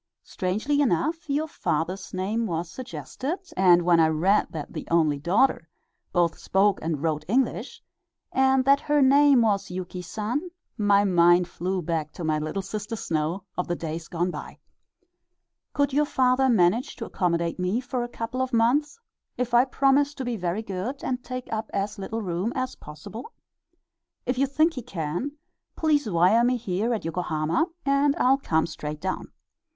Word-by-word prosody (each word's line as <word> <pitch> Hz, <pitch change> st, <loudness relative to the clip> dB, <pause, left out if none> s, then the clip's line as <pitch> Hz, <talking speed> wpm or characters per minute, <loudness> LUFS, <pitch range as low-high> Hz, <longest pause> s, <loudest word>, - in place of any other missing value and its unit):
Strangely 220 Hz, +11 st, -1 dB
enough 290 Hz, -, 0 dB
your 295 Hz, +3 st, 0 dB
father's 175 Hz, -, -2 dB
name 210 Hz, +5 st, -1 dB
was 170 Hz, -1 st, -3 dB
suggested, 260 Hz, -, -5 dB, 0.2 s
and 180 Hz, -2 st, +5 dB
when 170 Hz, -1 st, +4 dB
I 160 Hz, -, +5 dB
read 175 Hz, +7 st, +2 dB
that 155 Hz, -3 st, -7 dB
the -, -, -6 dB
only 155 Hz, -4 st, +2 dB
daughter 195 Hz, -, +2 dB, 0.4 s
both 175 Hz, -2 st, +1 dB
spoke 195 Hz, +1 st, +2 dB
and 160 Hz, -2 st, -2 dB
wrote 155 Hz, -2 st, 0 dB
English, 255 Hz, +7 st, -1 dB, 0.5 s
and 265 Hz, 0 st, +3 dB
that 275 Hz, +1 st, +5 dB
her 295 Hz, 0 st, +1 dB
name 275 Hz, -2 st, +6 dB
was 205 Hz, -3 st, +1 dB
Yuki 180 Hz, 0 st, -5 dB
San, 220 Hz, -, -3 dB, 0.3 s
my 205 Hz, -2 st, +3 dB
mind 175 Hz, -2 st, +4 dB
flew 180 Hz, +1 st, -3 dB
back 155 Hz, -2 st, -2 dB
to 175 Hz, -, -7 dB
my 155 Hz, -1 st, +1 dB
"Little 155 Hz, +6 st, -3 dB
Sister 210 Hz, +3 st, -5 dB
Snow" 165 Hz, -1 st, -2 dB
of 180 Hz, -, -2 dB
the 175 Hz, -, -1 dB
days 165 Hz, 0 st, -5 dB
gone 175 Hz, +1 st, -1 dB
by. -, -, -8 dB, 1.1 s
Could 285 Hz, -1 st, 0 dB
your 295 Hz, +2 st, +3 dB
father 260 Hz, -1 st, +2 dB
manage 225 Hz, +5 st, +2 dB
to 230 Hz, -, -6 dB
accommodate 170 Hz, -3 st, -1 dB
me 180 Hz, +6 st, 0 dB
for 250 Hz, 0 st, -3 dB
a -, -, -3 dB
couple 240 Hz, +2 st, -4 dB
of 260 Hz, -1 st, -2 dB
months, 265 Hz, -, +2 dB, 0.4 s
if 245 Hz, -1 st, -2 dB
I 240 Hz, +2 st, +6 dB
promise 275 Hz, +2 st, +2 dB
to 265 Hz, -, -5 dB
be 245 Hz, -1 st, -2 dB
very 180 Hz, +2 st, -2 dB
good 210 Hz, +7 st, -5 dB
and 250 Hz, -1 st, -2 dB
take 255 Hz, 0 st, -5 dB
up 220 Hz, 0 st, -3 dB
as 200 Hz, +1 st, -2 dB
little 220 Hz, +3 st, -4 dB
room 180 Hz, +4 st, -2 dB
as 255 Hz, -1 st, -2 dB
possible? 185 Hz, -, -10 dB, 0.9 s
If 250 Hz, 0 st, -1 dB
you 275 Hz, -, +3 dB
think 310 Hz, +5 st, +2 dB
he 255 Hz, -, -5 dB
can, 195 Hz, -, -4 dB, 0.4 s
please 295 Hz, -6 st, +1 dB
wire 185 Hz, +6 st, +4 dB
me 250 Hz, +1 st, +2 dB
here 210 Hz, +1 st, -1 dB
at 225 Hz, -7 st, -2 dB
Yokohama, 165 Hz, -, 0 dB, 0.2 s
and 280 Hz, +1 st, +3 dB
I'll 270 Hz, +2 st, +3 dB
come 160 Hz, -, +1 dB
straight 150 Hz, -2 st, -6 dB
down. 185 Hz, +3 st, -4 dB
210 Hz, 170 wpm, -25 LUFS, 175-260 Hz, 1.1 s, name